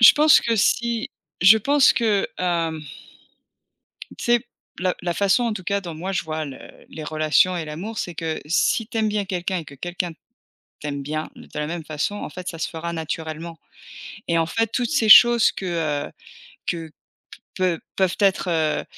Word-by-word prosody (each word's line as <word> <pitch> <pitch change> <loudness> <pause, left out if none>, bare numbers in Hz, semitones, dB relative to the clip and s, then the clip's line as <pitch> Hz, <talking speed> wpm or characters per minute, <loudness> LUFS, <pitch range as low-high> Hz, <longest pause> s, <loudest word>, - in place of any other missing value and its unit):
Je 235 - +10
pense 305 0 +6
que 230 -1 0
si 235 +2 +1 0.3
je 190 +5 +8
pense 280 +5 +4
que, 215 -4 +1
hem 165 -3 -1 1.4
tu - - -6
sais? 240 0 +4 0.4
La 185 0 +1
la 175 -1 -1
façon 200 +6 +2
en 230 - 0
tout 195 -4 -6
cas 200 +2 0
dont 175 -4 -7
moi 185 +5 -4
je 180 - 0
vois 155 -1 -4
le 135 -3 -8 0.3
les 155 - -8
relations 155 +4 +2
et 170 - -3
l'amour, 175 +9 -6
c'est 175 - -4
que 160 -1 -3
si 190 +7 +1
tu 230 - -8
aimes 220 -1 +2
bien 210 -1 -1
quelqu'un 185 -1 -2
et 165 - -7
que 140 - -12
quelqu'un 175 +3 -4 0.7
t'aime 140 -1 -4
bien 155 +2 -4
de - - -13
la 150 - -1
même 165 +1 -5
façon 155 +6 -2
en - - -6
fait 180 0 -7
ça 165 - -6
se - - -2
fera 170 +1 -5
naturellement, 160 +1 -5 0.7
et 170 - +2
en 165 - +1
fait 225 +7 0
toutes 245 -1 -1
ces 275 -8 +1
choses 240 +1 +8
que, 190 - -6 0.4
heu, - - -20 0.6
que 165 -2 -3 0.6
peu 180 -3 0 0.2
peuvent 190 -2 +1
être, 195 -2 +2
heu 160 -2 0
175 Hz, 190 wpm, -23 LUFS, 160-210 Hz, 1.4 s, Je